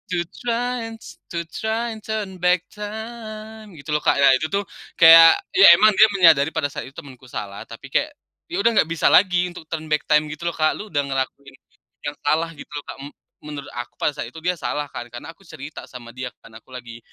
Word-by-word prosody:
to 170 - 0 0.2
try 245 0 -2
and 225 - -9
s - - -13
to 170 -1 -4
try 225 +2 -2
and 220 - -8
turn 210 -3 -5
back 180 0 +2
time," 215 -1 -9
gitu 150 0 -9
loh 150 - +1
Kak, - - +2
ya 140 -1 +5
itu 160 - -2
tuh 200 +4 -1 0.3
kayak, 165 0 +8
ya 190 -3 +8
emang 215 +4 +5
dia 215 +2 +6
menyadari 160 -5 +5
pada 145 - -1
saat - - -7
itu 135 - -15
temanku 130 -2 -12
salah, 100 -4 -7
tapi 125 +3 -12
kayak, 295 - -1 0.4
ya 355 - -2
udah 235 - +4
nggak 160 - +3
bisa 165 - +1
lagi 180 -1 +4 0.2
turn 160 -1 -4
back 150 0 0
time 150 0 +4
gitu 150 - -11
loh - - -7
Kak. 155 -1 +2
"Lu 215 - -9
udah 145 - 0
ngelakuin 135 0 -4 0.5
yang 145 - -3
salah," 160 +3 +1
gitu - - -11
loh 145 - -6
Kak, - - -7 0.5
menurut 150 -2 -8
aku 120 0 -6
pada 150 - 0
saat - - -5
itu - - -14
dia 180 +1 +1
salah 145 0 -3
kan, - - -6
karena 120 +6 -9
aku - - -28
cerita 155 -1 -9
sama 120 -2 -11
dia 130 -1 -5
kan, - - -14
aku 115 - -15
lagi 120 -2 -10
165 Hz, 220 wpm, -21 LUFS, 140-210 Hz, 0.5 s, kayak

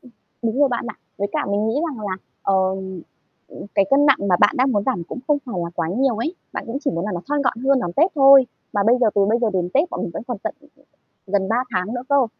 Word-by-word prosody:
Ừm, 250 - -17 0.3
đúng 230 +4 -1
rồi 285 - +5
bạn 240 -2 -2
ạ. 215 - -6 0.2
Với 200 0 -2
cả - - -1
mình 205 +2 0
nghĩ 225 - -1 0.2
rằng 220 -7 -6
là, 185 -2 -3 0.3
ờm, 190 -1 -1 0.5
ừm, - - -10
cái 200 - +4
cân 285 +2 +5
nặng 275 - +5
mà 180 - +4
bạn 205 - +5
đang 260 +1 +3
muốn 205 -3 +1
giảm 255 -10 -1
cũng 180 - -7
không 295 -1 +2
phải 240 - -6
là 170 - -4
quá 165 -2 -2
nhiều 245 +5 +1
ấy. 275 +11 -2 0.2
Bạn - - -5
cũng 235 +4 -3
chỉ - - +2
muốn 170 +2 -3
là 210 - -3
nó 175 - -3
thon 290 -1 0
gọn 255 - 0
hơn 270 -1 +3
đón 175 -7 -3
Tết 330 - +3
thôi. 275 -2 +7 0.3
Mà 205 - +1
bây 240 +2 +5
giờ 235 - +4
từ 200 -1 +4
bây 225 +3 +2
giờ 235 - +2
đến 180 -2 -1
Tết 315 +6 +2
bọn 350 - -4
mình - - -3
vẫn 165 - -5
còn 245 -5 -4
tận, - - -5
ừm, 295 - -21 0.6
ừm, 190 - -13
gần 195 -2 +1
3 225 - +1 0.2
tháng 185 +5 -1
nữa 245 - -4
cơ. 280 -3 +3
225 Hz, 290 wpm, -21 LUFS, 195-270 Hz, 0.6 s, thôi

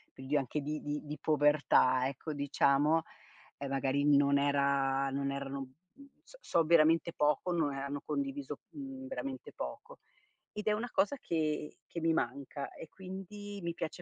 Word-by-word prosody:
li 135 +3 -3
ho - - +5
anche 140 +3 -2
di 150 +2 -3
di 145 0 -3
di 150 +1 -5
povertà 145 -4 +4
ecco, 140 +3 -5
diciamo, 145 +2 +3 0.5
e 140 - -4
magari 135 +1 +1
non 140 0 +5
era 140 -1 +2
non 140 0 -1
erano 140 0 -4
mhmm, 175 - -12 0.2
s - - -16
so 170 - +2
veramente 165 +1 +4
poco, 150 +4 +1
no 165 -4 +2
hanno 140 +1 -4
condiviso, 280 0 -3
mhmm, 270 -2 -7
veramente 265 0 -5
poco. - - -7 0.5
Ed 210 0 -6
è - - +5
una 235 +3 -2
cosa 205 +9 +2
che 155 - -2
che 170 - -5
mi 165 0 +3
manca 140 +1 -3
e 165 - -9
quindi 195 +2 -8
mi 170 0 -2
piace 165 +2 -5
150 Hz, 165 wpm, -33 LUFS, 140-180 Hz, 0.5 s, ho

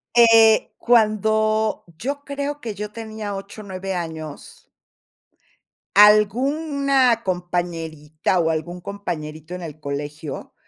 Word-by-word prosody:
Eh, 225 -2 +6
cuando 215 -1 +2
yo 285 - -4
creo 285 +1 -4
que 225 -7 -6
yo 210 +1 -5
tenía 215 -2 -6
8 200 +2 -8
o - - -10
9 190 0 -5
años 160 -3 -7 1.3
alguna 260 +4 +4
compañerita 175 -3 -2
o 165 -1 +2
algún 170 +3 -3
compañerito 170 -4 -6
en 180 - -7
el 155 -2 -8
colegio, 145 +1 -6
200 Hz, 105 wpm, -22 LUFS, 165-225 Hz, 1.3 s, Eh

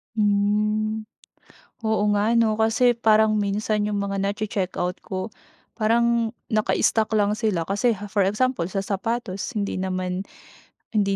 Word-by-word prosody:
Hmm, 210 +1 +1 0.8
Oo 220 -1 +1
nga 215 +3 +2
'no, 225 -2 +3
kasi 225 +2 +3
parang 220 -1 +4
minsan 210 +1 0
'yung 210 - -1
mga 200 0 -2
nache-check-out 195 -3 -2
ko 185 +2 -4 0.5
parang 230 0 +2 0.2
naka-stock 220 -1 +1
lang 205 0 +2
sila. 210 -7 -1
Kasi 205 +5 +2 0.2
for 200 0 +2
example 210 +1 +1
sa 195 - -1
sapatos, 195 +1 -3
hindi 200 -1 -2
naman 185 0 -2 0.7
hindi 200 -2 +2
210 Hz, 125 wpm, -24 LUFS, 195-220 Hz, 0.8 s, parang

